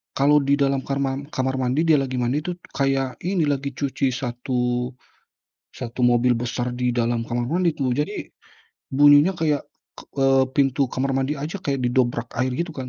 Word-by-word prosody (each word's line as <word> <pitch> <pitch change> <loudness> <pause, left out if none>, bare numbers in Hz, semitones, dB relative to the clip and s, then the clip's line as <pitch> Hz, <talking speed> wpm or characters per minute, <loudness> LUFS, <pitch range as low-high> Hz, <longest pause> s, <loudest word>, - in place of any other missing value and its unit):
kalau 145 +2 +4
di 140 +1 +3
dalam 140 -1 +1
karma 135 -1 -1
kamar 130 -2 -2
mandi 130 +5 +1
dia 160 -2 +4
lagi 130 -1 -3
mandi 125 +4 0
itu, 180 - -3 0.2
kayak 135 -1 -1
ini 180 -2 +1
lagi 140 -1 -1
cuci 135 -1 -1
1 125 0 -2 0.8
1 120 0 -6
mobil 120 0 +4
besar 120 +1 -2
di 125 0 0
dalam 120 -1 0
kamar 120 +1 -2
mandi 170 -1 +1
tuh. 135 -4 -1
Jadi 150 - -3 0.6
bunyinya 145 +5 +6
kayak 155 -4 0 0.4
k - - -7 0.2
eee, 135 0 +4
pintu 135 -1 +2
kamar 135 +1 -1
mandi 135 +3 0
aja 155 +7 -4
kayak 140 -1 -1
didobrak 120 -1 +1
air 130 +1 +1
gitu 170 +4 -3
kan 130 -2 -6
135 Hz, 170 wpm, -23 LUFS, 125-145 Hz, 0.8 s, bunyinya